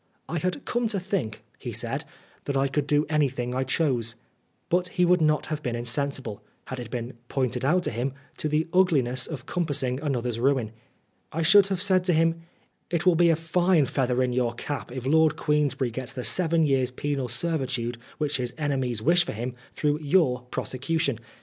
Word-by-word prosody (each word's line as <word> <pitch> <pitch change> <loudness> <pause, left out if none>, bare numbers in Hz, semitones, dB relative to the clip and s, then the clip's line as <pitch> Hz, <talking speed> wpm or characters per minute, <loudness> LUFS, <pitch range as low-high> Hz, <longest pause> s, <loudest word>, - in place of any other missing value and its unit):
" - - -43
I 170 - -2
had 185 - -2
come 240 -1 0
to 210 -3 -1
think," 175 - -3 0.2
he - - -5
said, - - -2 0.2
" - - -31
that 140 -1 -1
I 135 +1 +3
could 140 +1 -1
do 150 +1 +3
anything 135 -5 0
I 130 +1 0
chose." 125 -5 0 0.5
But 180 +1 +1
he 180 -1 +1
would 180 0 +4
not 155 -1 +2
have 155 -1 -3
been 120 -4 -2
insensible, 120 -2 -2 0.2
had 130 - -6
it 120 -2 -6
been 120 0 -4 0.2
pointed 125 -2 -1
out 175 +7 +3
to - - -1
him, 125 +4 -2 0.2
to 155 - -2
the 155 +2 +1
ugliness 135 -9 +3
of 140 -6 -6
compassing 140 -7 0
another's 125 -6 -1
ruin. 130 -4 +1 0.6
I 165 +2 -1
should 195 +4 +7
have 190 -1 -1
said 185 -2 +3
to 180 - +3
him, 165 +1 +2 0.5
"It 175 0 -1
will 180 - +6
be 170 +1 +4
a 165 - +5
fine 165 0 +2
feather 130 -1 +1
in 125 -1 0
your 120 -2 0
cap 140 +1 -5
if 130 0 -5
Lord 160 +3 +4
Queensberry 145 -4 +1
gets 130 +1 -5
the 125 - -5
seven 165 0 +2
years' 135 -4 +2
penal 135 0 -2
servitude 125 -4 -2 0.2
which 150 -2 0
his 125 -1 -3
enemies 130 -7 -1
wish 175 +3 +5
for - - -5
him, 120 +3 -4 0.2
through 150 0 0
your 140 -6 +2
prosecution 140 0 -1
140 Hz, 195 wpm, -26 LUFS, 125-165 Hz, 0.6 s, should